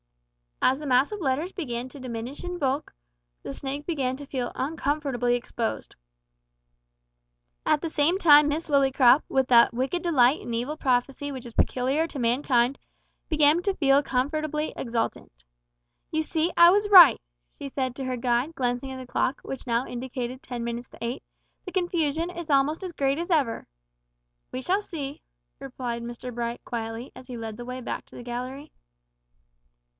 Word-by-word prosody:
As 260 - +4
the 300 - -6
mass 260 +5 +3
of 420 - -5
letters 305 +3 -1
began 250 -9 -4
to 280 - -11
diminish 250 +1 -6
in 355 0 -4
bulk 275 -2 -1 0.5
the - - -5
snake 280 - -5
began 265 -6 -1
to 285 - -9
feel 255 -3 -3
uncomfortably 275 -4 -1
exposed. 235 -1 -4 1.7
At 300 - +3
the 330 - -3
same 315 +4 +2
time 300 -5 +7
Miss 305 +3 -2
Lillycrop, 270 -2 +5
with 265 -1 +1
that 235 -1 +6
wicked 270 +8 -1
delight 285 -5 +3
in 235 - -6
evil 250 +6 -2
prophecy 275 +1 0
which 260 -3 -7
is 235 - -9
peculiar 265 +9 +1
to 290 - -6
mankind, 245 +1 +2 0.5
began 310 +1 +4
to 395 0 0
feel 280 -3 +4
comfortably 300 +3 -1
exultant. 225 - -4 0.7
"You 315 0 0
see 320 +2 0
I 340 0 +9
was 410 +2 +2
right!" 355 - +9 0.4
she 280 - -6
said 260 -2 -2
to 270 - -5
her 255 -1 -2
guide, 245 +5 0
glancing 250 +1 -2
at 260 - -6
the 255 -1 -10
clock, 260 +2 0
which 270 - -7
now 235 +1 +1
indicated 250 +1 -5
ten 245 -1 -6
minutes 235 +1 -5
to - - -16
eight; 235 +2 -4 0.4
"the 370 - -6
confusion 340 -3 0
is 345 -2 -7
almost 290 +5 +2
as 370 - -4
great 275 -2 0
as 345 +2 -4
ever." 275 -9 +1 0.8
"We 255 - -4
shall 380 +7 +1
see," 290 -8 -6 0.4
replied 250 -3 -5
Mr 240 +1 -7
Bright, 235 0 -4
quietly, 225 +1 -5
as 255 - -12
he 250 -2 -7
led 225 -2 -6
the 240 - -7
way 255 +1 -6
back - - -5
to - - -17
the - - -8
gallery. 250 +4 -6
270 Hz, 170 wpm, -26 LUFS, 245-305 Hz, 1.7 s, I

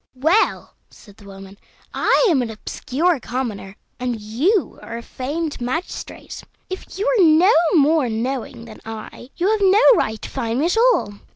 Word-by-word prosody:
"Well," 320 +11 +1 0.2
said 205 -2 -18
the 205 - -17
woman, 195 0 -12 0.3
"I - - +2
am 310 -9 +3
an 240 - -3
obscure 275 +8 -2
commoner, 225 -6 -5 0.2
and 245 -2 -3
you 275 - 0
are 230 - -7
a 235 - -8
famed 295 +4 -5
magistrate; 260 +9 -5 0.3
if 375 - -7
you 405 - -2
are - - +3
no 330 +5 +5 0.2
more 300 -3 +3
knowing 230 +1 -4
than 220 -2 -13
I, 225 +2 -9
you 375 +4 +1
have 435 -1 0
no 395 +4 +4
right 220 - -1
to - - -6
fine 230 0 -2
me 290 - +1
at 355 +6 0 0.2
all. 205 - -4
260 Hz, 170 wpm, -20 LUFS, 225-340 Hz, 0.3 s, no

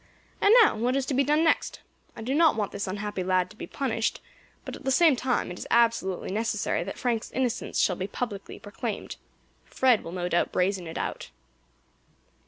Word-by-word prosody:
And 405 - +5
now - - +3
what 245 +4 0
is 275 -1 0
to 275 - -2
be 275 +2 +3
done 300 +3 +2
next? 325 - +1 0.4
I 225 - -8
do 255 +4 -2
not 320 +1 +4
want 210 -3 -2
this 200 0 -4
unhappy 205 0 -3
lad 185 0 +1
to - - -14
be - - -8
punished, 230 -5 -2 0.5
but - - -6
at - - -12
the 270 - -1
same 305 +2 +5
time 250 -5 -1
it 180 - -8
is - - -7
absolutely 230 -7 +1
necessary 215 -4 -1
that 195 - -7
Frank's 235 -3 -1
innocence 255 -3 -2
shall 180 - +3
be 190 - -3
publicly 205 -2 -5
proclaimed. 215 +1 -6 0.5
Fred 255 -4 +2
will 165 - -7
no 175 0 -3
doubt 175 -1 +1
brazen 185 -1 0
it 160 - -6
out." - - -4
220 Hz, 195 wpm, -27 LUFS, 190-260 Hz, 0.5 s, And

